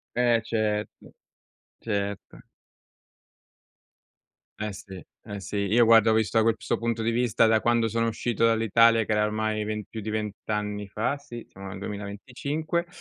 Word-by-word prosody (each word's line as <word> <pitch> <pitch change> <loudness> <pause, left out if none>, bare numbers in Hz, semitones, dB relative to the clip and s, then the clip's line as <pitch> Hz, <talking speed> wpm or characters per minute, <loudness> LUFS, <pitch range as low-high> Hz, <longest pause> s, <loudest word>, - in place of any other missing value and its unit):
Eh 120 -1 +3
certo. 105 -2 -3 0.7
Certo. 100 -2 -4 2.2
Eh 105 -1 -3
sì, 95 -1 -10 0.2
eh 100 0 -6
sì, 100 +1 -5
io 120 +2 +5
guarda 115 0 +6
ho 110 - +4
visto 110 -1 +2
da - - +4
questo 115 0 0
punto 115 -1 -1
di 115 - +1
vista, 115 -1 +2
da 110 -1 +3
quando 120 -1 +2
sono 115 +1 0
uscito 115 0 -1
dall'Italia 115 0 +4
che - - -4
era 105 0 +3
ormai 110 0 -1
ven 105 0 -3
più 110 - -7
di 105 - -5
20 105 -1 -2
anni 105 -1 -3
fa, 110 +7 -1
sì, 120 -5 -9
siamo 95 0 -11
nel 95 +1 -7
2025; 125 - -4
110 Hz, 155 wpm, -26 LUFS, 105-115 Hz, 2.2 s, guarda